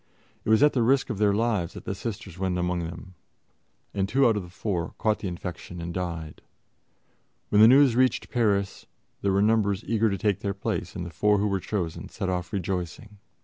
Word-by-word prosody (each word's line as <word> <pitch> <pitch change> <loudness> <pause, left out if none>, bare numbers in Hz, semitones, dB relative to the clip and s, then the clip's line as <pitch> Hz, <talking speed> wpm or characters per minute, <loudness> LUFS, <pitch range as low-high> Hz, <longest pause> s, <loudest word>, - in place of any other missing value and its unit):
It - - -4
was 110 +4 +5
at 150 - +5
the 125 - +1
risk 135 +2 +2
of 105 - -4
their 105 -1 +4
lives 105 -5 0
that - - -9
the - - -2
Sisters 95 -4 -6
went 95 -2 0
among 90 0 0
them, 85 +3 -9 0.8
and 95 -1 -1
two 135 +3 +3
out 115 -3 +4
of 105 - -1
the 90 - -10
four 90 -2 -3
caught 110 -1 +1
the 100 - -4
infection 90 0 -6
and 85 0 -5
died. 85 -4 -5 1.1
When 105 - +5
the 110 - +10
news 135 -1 +6
reached 130 +1 +1
Paris, 100 -5 0 0.3
there 100 - +1
were 100 +1 +3
numbers 105 -2 +2
eager 115 -1 +2
to 100 - -1
take 105 -2 0
their 100 -1 -3
place, 100 - -3
and 90 - -4
the 85 - -7
four 105 +7 +2
who 100 - +1
were 100 -1 0
chosen 90 -5 -4
set 95 - -3
off 90 -1 -2
rejoicing. 95 +2 -4
100 Hz, 210 wpm, -26 LUFS, 90-110 Hz, 1.1 s, the